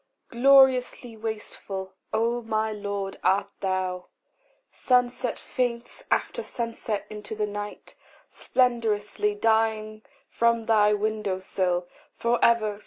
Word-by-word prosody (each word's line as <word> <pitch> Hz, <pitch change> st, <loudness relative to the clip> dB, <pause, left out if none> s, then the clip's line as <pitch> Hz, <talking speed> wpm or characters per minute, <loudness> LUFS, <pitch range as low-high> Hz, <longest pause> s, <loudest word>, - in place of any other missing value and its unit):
Gloriously 255 Hz, -2 st, +4 dB
wasteful, 210 Hz, -3 st, -5 dB, 0.2 s
O 230 Hz, +2 st, +1 dB
my 220 Hz, -1 st, -1 dB
Lord, 200 Hz, -2 st, -4 dB
art 200 Hz, +1 st, +2 dB
thou! 185 Hz, -1 st, -2 dB, 0.6 s
Sunset 250 Hz, -1 st, +1 dB
faints 245 Hz, -, -3 dB
after -, -, 0 dB
sunset 230 Hz, -, -4 dB
into 210 Hz, +1 st, -7 dB
the 210 Hz, 0 st, 0 dB
night, 205 Hz, 0 st, -7 dB, 0.3 s
Splendorously 210 Hz, -4 st, 0 dB
dying 220 Hz, -1 st, +1 dB, 0.3 s
from 235 Hz, 0 st, +1 dB
thy 215 Hz, -2 st, +4 dB
window 210 Hz, -2 st, -1 dB
sill 180 Hz, -2 st, -1 dB, 0.3 s
For 235 Hz, +1 st, 0 dB
ever. 215 Hz, -3 st, +3 dB
220 Hz, 105 wpm, -26 LUFS, 205-235 Hz, 0.6 s, Gloriously